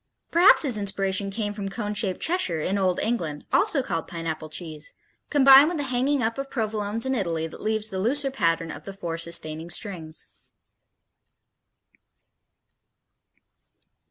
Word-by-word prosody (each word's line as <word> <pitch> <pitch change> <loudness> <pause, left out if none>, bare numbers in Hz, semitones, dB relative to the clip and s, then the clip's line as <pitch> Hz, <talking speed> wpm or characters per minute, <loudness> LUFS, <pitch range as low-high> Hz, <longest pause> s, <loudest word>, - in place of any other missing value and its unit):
Perhaps 345 +2 +6
his 250 -7 +2
inspiration 195 0 0
came 205 +1 -3
from 200 -1 -5
cone 210 +1 -4
shaped 195 -3 -1
Cheshire 320 - +2
in 195 +6 -1
old 185 -2 +1
England, 165 -11 -3
also 325 -10 +3
called 165 -9 -3
Pineapple 160 -2 -5
cheese, 155 -1 -4 0.3
combined 275 0 +7
with 345 0 -2
the 290 - -2
hanging 260 +1 0
up 230 +4 -2
of 275 0 -5
Provolones 220 -2 -2
in 265 - 0
Italy 170 -8 -1
that 165 - -9
leaves 220 0 -1
the 190 - -3
looser 270 +7 +1
pattern 165 -9 0
of - - -10
the 195 - -7
four 170 -4 -5
sustaining 165 -1 0
strings. 170 -4 -2
200 Hz, 145 wpm, -25 LUFS, 165-250 Hz, 0.3 s, combined